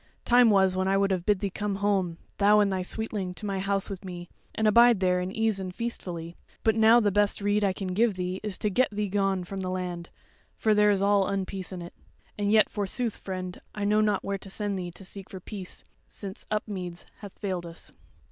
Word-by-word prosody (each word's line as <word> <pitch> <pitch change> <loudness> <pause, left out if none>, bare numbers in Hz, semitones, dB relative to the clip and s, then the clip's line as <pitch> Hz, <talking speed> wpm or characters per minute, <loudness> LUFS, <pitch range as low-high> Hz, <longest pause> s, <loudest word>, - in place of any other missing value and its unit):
time 245 -1 +6
was 190 -2 +4
when 185 0 0
I 195 +1 +3
would 195 0 +2
have 180 -2 -1
bid 205 -3 +3
thee 200 - -1
come 205 +1 -2
home, 195 -4 0 0.2
thou 210 +1 +6
and 200 -2 +3
thy 185 - -1
sweetling, 195 -1 -3
to 210 - -7
my 195 -2 -2
house 195 0 0
with 195 -2 -7
me, 175 -2 -7 0.3
and 220 - +2
abide 235 0 +6
there 180 -1 +2
in 180 +1 -3
ease 220 -1 0
and 185 -1 -4
feastfully; 175 -8 -5 0.3
but 220 - +4
now 225 +2 +6
the 210 -3 +2
best 205 +1 +2
rede 205 +1 +1
I 195 - +3
can 190 0 -5
give 210 +3 +2
thee 180 +1 -3
is 210 -3 -4
to 210 - -1
get 255 +6 +3
thee 210 0 -2
gone 195 -1 +1
from 195 +2 -6
the 185 - -3
land, 180 -2 -4 0.5
for 220 - +3
there 210 0 +5
is 200 -1 +2
all 200 -1 +3
unpeace 195 -1 -3
in 180 -2 -6
it. 170 - -10 0.4
And 205 0 0
yet, 215 -1 +6
forsooth, 215 +3 -1
friend, 185 -1 -6
I 205 -1 -2
know 210 +1 +3
not 210 -2 +1
where 200 0 -2
to 195 - -11
send 200 0 -2
thee 175 -1 -4
to 175 +3 -10
seek 195 0 -8
for 190 - -8
peace, 190 0 -7 0.2
since 195 -2 -5
Upmeads 190 -5 -4
hath 205 -2 -10
failed 185 -4 -3
us." 165 - -10
195 Hz, 230 wpm, -27 LUFS, 185-210 Hz, 0.5 s, time